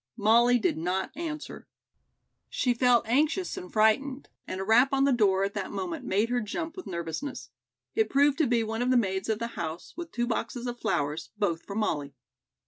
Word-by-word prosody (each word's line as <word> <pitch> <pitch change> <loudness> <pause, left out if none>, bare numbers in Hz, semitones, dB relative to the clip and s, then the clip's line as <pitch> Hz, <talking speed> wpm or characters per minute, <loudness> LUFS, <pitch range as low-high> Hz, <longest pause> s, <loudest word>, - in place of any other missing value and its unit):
Molly 235 +4 +5
did 210 -8 0
not 180 +3 -2
answer. 310 -1 -6 0.8
She 250 - +1
felt 240 -2 +3
anxious 305 +9 +1
and 180 - -8
frightened, 260 +6 +2 0.2
and 185 - -4
a - - -2
rap 240 +7 +4
on 270 0 +3
the 280 - +4
door 195 -5 +3
at 200 0 -1
that 200 -3 -3
moment 335 -6 -4
made 215 0 +1
her 245 0 +1
jump 320 +10 -4
with 370 - -8
nervousness. 170 - -5 0.4
It 440 0 +1
proved 280 +1 +3
to 310 - +3
be 235 -1 +2
one 225 +1 -3
of 250 - +1
the 255 - +4
maids 190 -3 0
of 220 - +1
the 230 - -3 0.2
house 160 +1 -6
with 340 -1 -7
two 240 - -1
boxes 240 +1 -3
of 245 0 -4
flowers, 150 +3 -1
both 170 -5 0
for 200 - -8
Molly. 145 -10 -1
235 Hz, 200 wpm, -28 LUFS, 195-275 Hz, 0.8 s, Molly